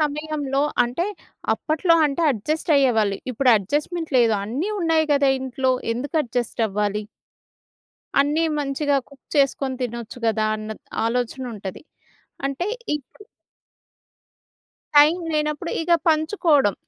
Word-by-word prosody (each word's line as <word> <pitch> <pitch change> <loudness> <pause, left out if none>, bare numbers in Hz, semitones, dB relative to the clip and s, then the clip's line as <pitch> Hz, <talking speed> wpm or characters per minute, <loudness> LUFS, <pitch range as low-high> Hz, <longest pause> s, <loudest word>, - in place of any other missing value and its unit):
సమయంలో 295 -2 -1 0.2
అంటే, 250 +10 -2 0.5
అప్పట్లో 320 +2 +2
అంటే 285 +4 -2
అడ్జస్ట్ 310 - -3
అయ్యేవాళ్ళు. 225 -7 +3
ఇప్పుడు 255 +1 +3
అడ్జస్ట్మెంట్ 300 - -2
లేదు, 230 -2 +4
అన్నీ 275 - -2
ఉన్నాయి 325 -2 +2
గదా! 280 -1 +4
ఇంట్లో 260 0 0 0.2
ఎందుకు 265 +6 -4
అడ్జస్ట్ 240 -2 -2
అవ్వాలి? 210 +1 -1 1.2
అన్నీ 295 +4 +2 0.2
మంచిగా 285 0 0
కుక్ 280 -1 -18
చేసుకొని 275 -2 +2
తినొచ్చు 235 0 -5
గదా! 220 -1 +1
అన్న 215 0 -7
త్ - - -55 0.2
ఆలోచన 245 +2 -1
ఉంటది. 195 -3 -7 0.7
అంటే 275 +6 -3 0.3
ఇపుడు 295 +8 -9 1.7
టైమ్ 305 +5 +6
లేనప్పుడు 300 +2 -1
ఇగ 345 - -2 0.2
పంచుకోవడం. 315 - +3
275 Hz, 115 wpm, -23 LUFS, 235-310 Hz, 1.7 s, టైమ్